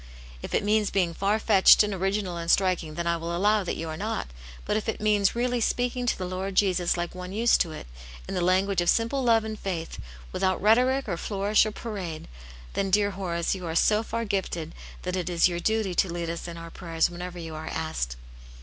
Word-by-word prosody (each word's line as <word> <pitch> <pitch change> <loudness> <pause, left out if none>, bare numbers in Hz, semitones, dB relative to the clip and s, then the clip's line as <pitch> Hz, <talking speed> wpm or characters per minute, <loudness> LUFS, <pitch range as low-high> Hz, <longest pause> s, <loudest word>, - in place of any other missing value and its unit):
" - - -17
If - - -4
it - - +1
means 210 0 +2
being 180 -4 +1
far 200 +5 +1
fetched, 210 -2 +6
and 210 -1 -2
original 195 -1 -1
and 170 0 -5
striking, 180 -5 +2
then 170 +1 -3
I 170 0 +1
will 170 +1 -3
allow 210 +2 +3
that 180 - -3
you 165 - -5
are 160 - -4
not 205 - -3 0.4
But 210 - 0
if 215 +1 -1
it - - -3
means 210 -1 +2
really 245 0 0
speaking 245 +2 0
to - - +1
the 185 - -4
Lord 185 +1 -4
Jesus 180 -3 +2
like 175 0 -3
one 180 0 -7
used 230 +4 +3
to 165 - 0
it, 155 - -8 0.4
in - - -5
the 180 - -1
language 185 +1 +2
of 175 - +1
simple 230 +4 +2
love 230 -2 +4
^nd 220 -1 -5
faith, 170 -4 -4 0.3
without 185 - 0
rhetoric 250 +6 +3
or 175 -4 -2
flourish 205 +3 +2
or - - -3
parade, 190 -8 -6 0.5
then, 195 - -1
dear 205 +1 +3
Horace, 170 -3 -2
you 185 -3 -5
are 160 - -3
so 210 +5 +4
far 230 +1 -3
gifted 180 -5 -3 0.3
that 180 0 -2
it 180 -2 -2
is 175 -1 +4
your 175 -1 -3
duty 220 0 0
to 175 0 +1
lead 170 -1 -3
us 170 +1 -6
in 170 -1 -7
our 165 0 -9
prayers 165 -1 -1
whenever 180 +1 -7
you 165 -2 -7
are 155 0 -7
asked." - - -3
185 Hz, 230 wpm, -26 LUFS, 170-210 Hz, 0.5 s, fetched